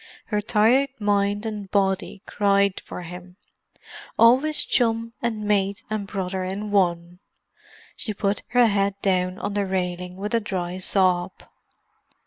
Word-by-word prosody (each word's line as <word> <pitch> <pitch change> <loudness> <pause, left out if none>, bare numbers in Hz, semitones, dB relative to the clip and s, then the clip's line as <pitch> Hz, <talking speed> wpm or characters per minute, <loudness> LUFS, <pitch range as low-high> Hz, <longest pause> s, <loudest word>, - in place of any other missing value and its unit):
Her 210 -2 0
tired 230 +6 +3
mind 205 0 +1
and 210 -3 -5
body 195 0 0
cried 200 -1 +2
for 180 - -8
him; 180 +1 -10 0.8
always 265 +7 +5
chum 230 -1 +1
and 225 -3 -2
mate 200 -1 0
and 210 -2 -2
brother 190 -1 -3
in 200 +3 -4
one. 175 -3 0 0.8
She 220 - -3
put 200 0 -1
her 245 +1 +4
head 200 -2 +1
down 185 -1 +1
on 205 - -4
the 200 -1 -1
railing 180 -1 -3
with 205 +4 -5
a 230 - +3
dry 185 -4 -4
sob. 185 -1 +1
200 Hz, 135 wpm, -24 LUFS, 185-215 Hz, 0.8 s, always